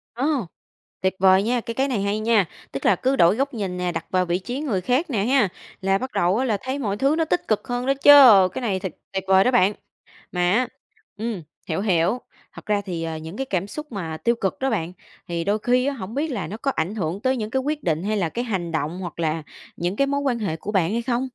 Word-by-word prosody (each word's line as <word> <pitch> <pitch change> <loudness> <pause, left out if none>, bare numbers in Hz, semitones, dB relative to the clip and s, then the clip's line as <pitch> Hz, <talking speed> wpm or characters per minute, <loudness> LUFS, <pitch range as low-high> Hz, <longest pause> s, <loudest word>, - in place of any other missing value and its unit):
Ô! 270 - 0 0.6
Tuyệt 190 0 +1
vời 190 +1 +5
nha, 240 +1 0
cái 230 - -5
cái 270 +3 0
này 235 -7 -1
hay 200 +2 0
nha! 215 -4 +3 0.3
Tức 135 - -5
là 190 - +5
cứ 260 +8 0
đổi 175 -1 +5
góc 275 +1 -1
nhìn 190 -5 -3
nè, 180 -1 -1
đặt 165 - -4
vào 185 -1 +2
vị 175 +1 0
trí 245 +8 -5
người 225 -12 -1
khác 260 - 0
nè 205 -6 0
ha, 255 -6 +3 0.3
là 195 0 +2
bắt 260 +3 -5
đầu 180 +5 +2
á 260 - +1
là 215 -5 +1
thấy 260 +2 -3
mọi 205 -5 -2
thứ 275 +5 +2
nó 325 -1 +1
tích 350 - -1
cực 215 +5 0
hơn 245 +1 -2
đó 275 - +3
chứ, 280 +1 +6 0.4
cái - - -4
này 195 -5 -1
thật 185 -3 -4 0.2
tuyệt 190 - -2
vời 190 0 +6
đó 255 - +2
bạn! 210 -4 +4 0.6
Mà 180 0 +1
á 245 +4 +2 0.5
ừm, 220 -4 -3 0.3
hiểu, 165 +4 -1
hiểu, 185 +2 +2 0.4
thật - - -12
ra 205 -1 +1
thì, 170 -3 -4
ờ, 160 -1 -3
những 160 +5 -8
cái 270 - -2
cảm 190 -4 -2
xúc 300 +4 -8
mà 165 -6 -4
tiêu 235 +6 +1
cực 190 -4 -2
đó 265 0 0
bạn, 180 -5 -2 0.3
thì 170 -1 -2
đôi 205 +3 0
khi 250 +3 +2
á 280 - 0
hổng 220 -3 -7
biết 305 +3 0
là 205 -10 -3
nó 210 +5 -6
có 275 +3 -1
ảnh 175 +7 -1
hưởng 180 -1 -2
tới 260 0 +1
những 215 -1 -3
cái 265 +2 0
quyết 295 +1 -3
định 165 +1 0
hay 215 +1 0
là 170 -4 0
cái 240 +7 -3
hành 180 -7 -2
động 160 +3 -2
hoặc 175 -2 -7
là 160 -1 -1 0.3
những 175 +3 -2
cái 275 +3 +2
mối 280 0 0
quan 250 -4 0
hệ 170 -7 -2
của 205 +6 -6
bạn 190 -2 +2
hay 235 +1 0
không? 240 0 -1
210 Hz, 265 wpm, -23 LUFS, 180-255 Hz, 0.6 s, chứ